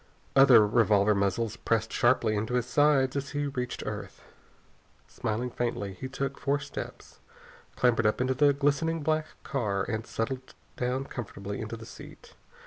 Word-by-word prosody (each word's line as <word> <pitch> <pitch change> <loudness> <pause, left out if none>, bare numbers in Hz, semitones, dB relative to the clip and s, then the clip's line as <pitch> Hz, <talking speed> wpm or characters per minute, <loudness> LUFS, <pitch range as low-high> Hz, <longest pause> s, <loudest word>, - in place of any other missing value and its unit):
Other 125 -5 +8
revolver 105 -2 +3
muzzles 100 +3 0
pressed 115 -1 -1
sharply 120 -3 +3
into 110 +4 -1
his 125 -2 +1
sides 140 -1 +3
as 140 0 -2
he 145 - 0
reached 125 -3 -4
earth. - - -6 0.8
Smiling 120 +4 -3
faintly, 115 -5 -2
he 130 +7 -6
took 135 +1 -4
four 140 +1 +1
steps, 145 - -8 0.6
clambered 115 -3 +3
up 105 - 0
into 130 +1 +1
the 145 +2 +4
glistening 145 +3 0
black 155 +1 +1 0.2
car, 105 -8 -1
and 110 +1 -4
settled 130 +3 -4 0.2
down 125 +2 -1
comfortably 100 -5 -6
into 110 +1 -5
the 115 - -10
seat. - - -13
125 Hz, 150 wpm, -28 LUFS, 110-135 Hz, 0.8 s, Other